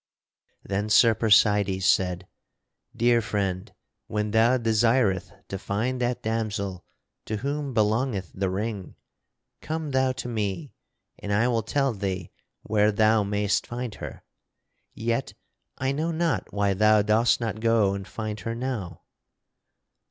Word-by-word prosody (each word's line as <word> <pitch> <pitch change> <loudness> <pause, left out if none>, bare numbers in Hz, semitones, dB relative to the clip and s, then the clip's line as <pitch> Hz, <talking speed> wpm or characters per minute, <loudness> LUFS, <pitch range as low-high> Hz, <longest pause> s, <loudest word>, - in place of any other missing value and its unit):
Then 100 +2 -2
Sir 115 +2 +6
Percydes 105 -3 +3
said: 90 0 +2 0.7
"Dear 120 0 +3
friend, 95 -4 -2 0.4
when 105 0 -2
thou 115 +4 +4
desireth 115 -3 +2 0.2
to 95 - -4
find 120 +7 -2
that 120 0 -1
damosel 105 -4 -2 0.4
to 110 - -3
whom 140 +2 -3
belongeth 110 -3 0
the 95 0 -1
ring, 100 0 -4 0.7
come 155 -1 -4
thou 130 0 +2
to 130 - -6
me 110 +4 -3 0.5
and 100 - -5
I 105 +4 +3
will 115 -2 +1
tell 135 +4 0
thee 95 -3 -4 0.3
where 105 0 +2
thou 110 +1 +3
mayst 100 0 0
find 120 -2 -5
her; - - -7 0.7
yet 115 +3 -2 0.4
I 130 +1 0
know 155 +4 -1
not 165 0 -1
why 100 -1 +1
thou 105 +1 +4
dost 110 +3 +3
not 110 -3 -3
go 110 -3 +3
and 100 0 -6
find 110 -1 -5
her 115 +4 -4
now." 115 - -4
110 Hz, 135 wpm, -26 LUFS, 100-120 Hz, 0.7 s, Sir